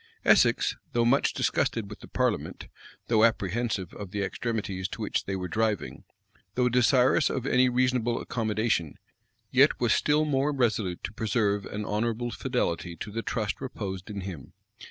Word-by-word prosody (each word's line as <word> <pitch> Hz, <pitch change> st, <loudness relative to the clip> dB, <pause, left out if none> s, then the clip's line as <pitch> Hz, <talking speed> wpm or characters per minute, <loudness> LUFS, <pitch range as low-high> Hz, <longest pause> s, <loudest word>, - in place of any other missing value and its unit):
Essex, -, -, +4 dB, 0.2 s
though 120 Hz, -1 st, +2 dB
much 135 Hz, +4 st, +3 dB
disgusted 115 Hz, -3 st, 0 dB
with 105 Hz, -, -10 dB
the -, -, -12 dB
parliament, -, -, -2 dB, 0.4 s
though 110 Hz, -2 st, +3 dB
apprehensive 110 Hz, -3 st, 0 dB
of 100 Hz, -2 st, -7 dB
the 100 Hz, +1 st, -2 dB
extremities 100 Hz, -4 st, -3 dB
to -, -, -8 dB
which -, -, -1 dB
they 95 Hz, -, -2 dB
were 90 Hz, -1 st, -3 dB
driving, 105 Hz, -, -2 dB, 0.5 s
though 125 Hz, 0 st, +3 dB
desirous 125 Hz, +4 st, +4 dB
of 130 Hz, -2 st, -3 dB
any 125 Hz, -1 st, +4 dB
reasonable 125 Hz, -2 st, +1 dB
accommodation, 110 Hz, -8 st, -1 dB, 0.6 s
yet -, -, +4 dB
was -, -, +3 dB
still 150 Hz, +1 st, +2 dB
more 140 Hz, 0 st, +1 dB
resolute 110 Hz, -9 st, 0 dB
to -, -, -5 dB
preserve 105 Hz, -2 st, 0 dB
an 105 Hz, 0 st, -5 dB
honorable 115 Hz, +3 st, -1 dB
fidelity 90 Hz, -11 st, -2 dB
to 105 Hz, +6 st, -7 dB
the 115 Hz, +2 st, -3 dB
trust 110 Hz, -3 st, -3 dB
reposed 95 Hz, -7 st, -5 dB
in 100 Hz, -2 st, -5 dB
him. 90 Hz, -7 st, -8 dB
110 Hz, 155 wpm, -27 LUFS, 100-125 Hz, 0.6 s, Essex